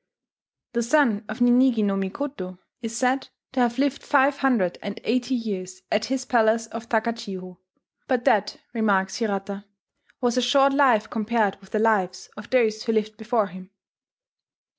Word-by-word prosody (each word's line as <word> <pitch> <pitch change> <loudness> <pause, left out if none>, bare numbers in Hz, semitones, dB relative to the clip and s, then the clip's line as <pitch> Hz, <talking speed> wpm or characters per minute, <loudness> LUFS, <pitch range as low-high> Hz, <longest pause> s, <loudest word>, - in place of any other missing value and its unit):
The 235 - +1
son 235 -4 +2
of 220 +3 -6
Ninigi 245 -2 +4
no 200 -1 +1
Mikoto 195 -1 -4 0.2
is 230 0 -4
said 260 +2 0 0.2
to 260 - -2
have 240 0 +2
lived 280 0 0
five 280 -1 +3
hundred 230 -10 +1
and 205 +2 -6
eighty 250 +2 0
years 190 -5 -5
at 215 +1 +1
his 260 +2 -2
palace 225 -2 +3
of 230 +1 -9
Takachiho; 200 -6 -3 0.5
but 250 -2 0
that, 210 -1 +2 0.2
remarks 200 -4 +1
Hirata, 200 -2 -3 0.5
"was 245 -1 0
a - - +4
short 275 +3 +4
life 250 -6 +4
compared 220 -3 0
with 195 - -17
the 215 - -1
lives 200 -4 +1
of 210 0 -10
those 220 -4 +2
who 225 -1 -1
lived 215 0 0
before 220 0 0
him." 185 -1 -11
225 Hz, 160 wpm, -24 LUFS, 205-250 Hz, 0.5 s, Ninigi